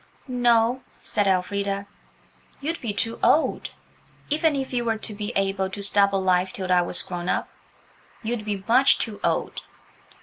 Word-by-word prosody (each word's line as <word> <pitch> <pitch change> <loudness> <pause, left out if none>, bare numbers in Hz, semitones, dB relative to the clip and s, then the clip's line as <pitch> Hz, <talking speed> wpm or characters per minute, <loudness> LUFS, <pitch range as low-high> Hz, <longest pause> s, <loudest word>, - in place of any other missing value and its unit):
"No," 245 0 +2 0.2
said 205 -2 0
Elfrida; 200 +1 0 0.7
"you'd 320 +4 -3
be 230 - -2
too 225 +3 -2
old–even 310 0 0
if 270 -1 -3
you 240 -1 0
were 225 -1 0
to 215 - -7
be 205 +2 -4
able 195 -1 0
to 200 +2 -5
stop 200 0 +4
alive 185 -1 +1
till 185 -2 -4
I 180 -1 +5
was 175 0 +1
grown 175 -1 -5
up, - - 0 0.7
you'd 225 0 -2
be 205 -2 -3
much 255 +4 +5
too 215 -3 -4
old." - - -1
205 Hz, 155 wpm, -24 LUFS, 195-240 Hz, 0.7 s, I